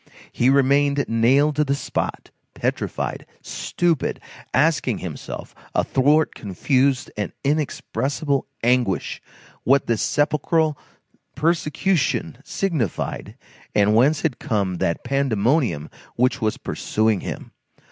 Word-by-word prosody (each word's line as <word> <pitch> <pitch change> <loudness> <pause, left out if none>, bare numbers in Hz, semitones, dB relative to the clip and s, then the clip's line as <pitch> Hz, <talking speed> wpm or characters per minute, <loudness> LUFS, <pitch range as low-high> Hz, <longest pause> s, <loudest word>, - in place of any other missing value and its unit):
He 125 - +2
remained 140 +1 +3
nailed 135 +6 +3
to 150 - +4
the 140 -1 0
spot, - - -3 0.2
petrified, - - -2 0.2
stupid, 170 -5 -1 0.3
asking 140 -4 +2
himself, 85 -5 -7 0.2
athwart 150 +4 +3
confused 130 +7 0
and 105 - -3
inexpressible 140 -1 -1 0.2
anguish, 120 -5 +1 0.4
what 135 +2 +3
this 115 -2 0
sepulchral 150 +1 +1 0.6
persecution 165 +3 0
signified, 160 - -2 0.4
and 105 0 +4
whence 140 +6 +4
had 150 -6 -1
come 100 -5 -1
that 85 - -1
pandemonium 120 - +1 0.3
which 125 +2 +1
was 110 -1 0
pursuing 110 -2 0
him. - - -6
135 Hz, 100 wpm, -22 LUFS, 115-150 Hz, 0.6 s, to